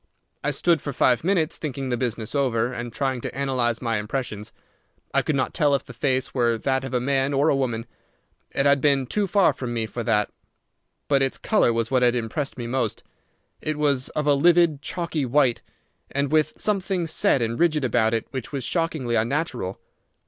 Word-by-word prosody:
I 145 - +1
stood 165 +3 +2
for 140 - -4
five 125 +1 +2
minutes 170 -3 +1
thinking 135 -3 -4
the 120 - +1
business 115 -3 -3
over, 125 -4 +1
and 120 -1 -5
trying 130 0 -2
to - - -6
analyze 130 -4 0
my 115 -2 0
impressions. 105 -1 -4 0.6
I - - +3
could 155 - -1
not 130 - -1
tell 145 -3 +3
if 135 - -2
the - - -10
face 130 -2 -1
were 120 -3 +2
that 130 +3 0
of 135 -1 -4
a - - +3
man 135 +2 0
or 145 +3 +3
a - - +3
woman. 120 -4 -1 0.6
It 135 - -1
had 140 -1 +4
been 140 -2 +3
too 205 +10 0
far 195 0 +4
from 120 -2 -5
me 115 -1 -1
for 120 +2 -5
that. 105 -3 +1 0.8
But 140 -1 +3
its 135 -1 0
colour 210 - +2
was 115 +1 -1
what 130 -1 +3
had 125 0 +4
impressed 125 +5 -3
me 120 - -4
most. 120 -3 -2 0.6
It 155 -1 -2
was 140 -4 +1
of 150 - -2
a 145 - +4
livid 165 0 +4
chalky 170 -2 -3
white, 130 -2 +2 0.5
and 140 0 -1
with 155 0 +2
something 195 -4 0
set 160 -3 +2
and 115 0 -2
rigid 155 -5 +2
about 115 -2 +2
it 115 - -2
which 130 -3 -5
was 140 -3 -3
shockingly 155 -6 -1
unnatural. 120 - -1
135 Hz, 200 wpm, -24 LUFS, 120-150 Hz, 0.8 s, had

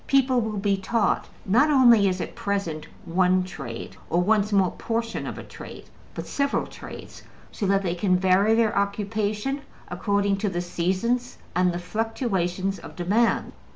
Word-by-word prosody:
People 260 -2 +3
will 220 -2 -3
be 200 0 +1
taught 220 +4 0 0.2
not 245 +10 +4
only, 240 -8 +6
as 185 0 -2
at - - -4
present, 195 -6 -3 0.2
one 185 +1 +3
trade, 135 -10 -7
or 170 - +2
one 210 +3 +3
small 195 -3 +2
portion 230 0 -3
of - - -5
a - - -7
trade, - - -10 0.3
but - - -5
several 280 0 0
trades, - - -10 0.3
so 200 - -2
that 195 0 +2
they 175 -2 0
can 180 +1 +2
vary 190 +4 +4
their 225 -2 +2
occupation 210 +5 -1 0.3
according 200 +2 0
to 205 +1 -1
the 175 -2 -2
seasons 190 +9 -1 0.2
and 180 0 +3
the 175 - -3
fluctuations 195 -2 -2
of - - -11
demand. 210 +7 +1
200 Hz, 160 wpm, -25 LUFS, 185-225 Hz, 0.3 s, only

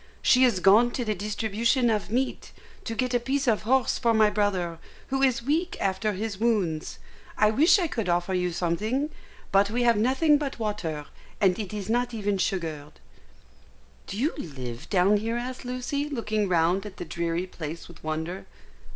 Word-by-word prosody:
She 260 -1 +5
is 235 -7 +3
gone 210 +7 +6
to 245 - -2
the 215 - 0
distribution 220 +4 0
of 210 -3 -1
meat, 255 +4 -2 0.3
to 225 - -3
get 255 +1 -1
a 245 - +3
piece 270 +3 -1
of 220 -3 +3
horse 255 +4 +1
for 230 -2 +2
my 215 -1 +5
brother, 190 -5 -1 0.3
who 270 0 0
is 255 -3 +2
weak 320 +7 0
after 195 +2 0
his 200 0 -4
wounds. 200 -9 0 0.4
I 215 0 +4
wish 315 - +5
I 365 - +1
could 225 - -2
offer 175 +2 +1
you 180 -1 0
something, 215 - -1 0.4
but 200 +1 +4
we 240 +3 0
have 235 -2 +4
nothing 270 +7 +3
but 280 -3 -4
water, 170 -9 -3 0.3
and 190 -1 +3
it 205 -4 -4
is 205 -3 -5
not 240 +1 0
even 205 -2 -1
sugared." 160 -7 -2 1.1
"Do 195 - -5
you 285 +8 +1
live 125 -7 -7
down 195 +2 +4
here?" 225 +3 -2
asked 250 +1 -5
Lucy, 255 +4 -3
looking 215 -6 -1
round 175 +2 +2
at 195 - -11
the 175 - -5
dreary 170 +1 -2
place 165 -2 -7
with 170 -2 -15
wonder. 160 +4 -4
215 Hz, 180 wpm, -26 LUFS, 180-245 Hz, 1.1 s, gone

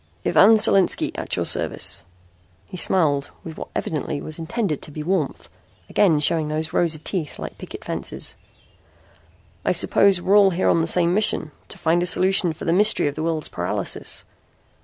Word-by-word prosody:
"Ivan 220 +3 +6
Solinski, 195 -3 +3
at - - -3
your - - -2
service." 95 -3 -1 0.6
He - - -11
smiled 150 -6 +1
with 160 -2 -8
what - - -8
evidently 150 -1 -3
was 155 +2 -4
intended 170 - -3
to - - -8
be 150 +1 -7
warmth, 170 -4 -2 0.4
again 170 -7 +3
showing 155 +1 +1
those 155 +2 -3
rows 170 -3 +1
of 155 - -14
teeth 170 -7 -4
like - - -8
picket - - -10
fences. - - -3 1.3
"I - - +1
suppose 195 -2 +3
we're 190 +3 +1
all 200 -1 +5
here 185 0 0
on 165 - +3
the 165 - -1
same 175 0 +3
mission: 200 -6 +2 0.2
to - - -9
find 170 +2 +1
a 175 - 0
solution 185 -1 +3
for 155 - -9
the 165 - +1
mystery 210 +4 +4
of 145 - -2
the 155 - -6
world's 160 -2 -2
paralysis." - - -3
165 Hz, 180 wpm, -22 LUFS, 155-190 Hz, 1.3 s, Ivan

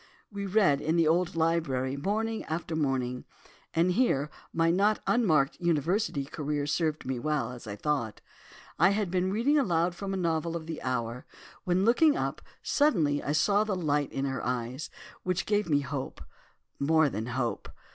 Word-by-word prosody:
We 200 -1 -4
read 190 -8 +3
in 160 +2 0
the 165 -2 +3
old 175 +2 +1
library, 155 -6 0
morning 220 +9 -2
after 165 0 -3
morning, 130 -4 -1 0.5
and 170 +2 +3
here 150 - +1 0.2
my 165 0 +2
not 205 +4 +2
unmarked 155 - +2
university 170 -1 0
career 145 0 -3
served 155 +1 -1
me 130 -1 -2
well, 150 -3 -1
as 120 -2 -10
I 100 - -5
thought. 120 -3 -2 0.6
I 175 +4 +6
had 205 -5 -1
been 185 0 +1
reading 260 +9 +2
aloud 175 -8 +1
from 195 +2 -5
a 195 - -1
novel 165 -2 -1
of 165 -2 -5
the 160 -1 -6
hour, 120 -1 -3 0.4
when, 185 +2 +2
looking 290 +6 +4
up - - -2 0.2
suddenly 165 - +2
I 145 - -2
saw 200 +7 +3
a - - +1
light 145 -4 0
in 135 - -2
her 135 -1 -3
eyes, 125 +3 -3 0.3
which 185 0 -1
gave 205 -3 0
me 145 -2 +3
hope, 140 - -5 0.6
more 160 +2 +4
than 110 -3 -4
hope. 120 -3 -2
160 Hz, 170 wpm, -29 LUFS, 140-185 Hz, 0.6 s, I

